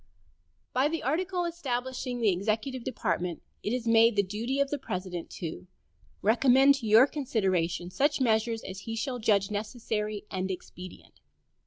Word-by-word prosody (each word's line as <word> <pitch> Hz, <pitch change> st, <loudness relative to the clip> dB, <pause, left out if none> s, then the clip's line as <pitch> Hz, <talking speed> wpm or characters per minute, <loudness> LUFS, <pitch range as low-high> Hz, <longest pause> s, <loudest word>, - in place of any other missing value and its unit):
By 260 Hz, +3 st, +3 dB
the 325 Hz, +2 st, -3 dB
article 355 Hz, +6 st, 0 dB
establishing 260 Hz, -6 st, -3 dB
the 215 Hz, -3 st, +4 dB
executive 220 Hz, +7 st, -2 dB
department 180 Hz, -8 st, -2 dB, 0.2 s
it 210 Hz, -, -2 dB
is 245 Hz, -1 st, -2 dB
made 230 Hz, 0 st, +5 dB
the 200 Hz, -, +3 dB
duty 225 Hz, +8 st, -3 dB
of 280 Hz, -1 st, +1 dB
the 290 Hz, -, -1 dB
President 185 Hz, -7 st, -5 dB
"to 170 Hz, +2 st, -5 dB, 0.6 s
recommend 260 Hz, +5 st, +5 dB
to 230 Hz, -, -5 dB
your 220 Hz, +4 st, +8 dB
consideration 190 Hz, -, -1 dB
such 285 Hz, +11 st, +1 dB
measures 225 Hz, -2 st, +1 dB
as 190 Hz, 0 st, -7 dB
he 225 Hz, +3 st, -5 dB
shall 245 Hz, +2 st, -3 dB
judge 205 Hz, -3 st, +2 dB
necessary 210 Hz, -1 st, -3 dB
and 190 Hz, 0 st, -2 dB
expedient." 185 Hz, 0 st, -9 dB
225 Hz, 150 wpm, -29 LUFS, 195-260 Hz, 0.6 s, your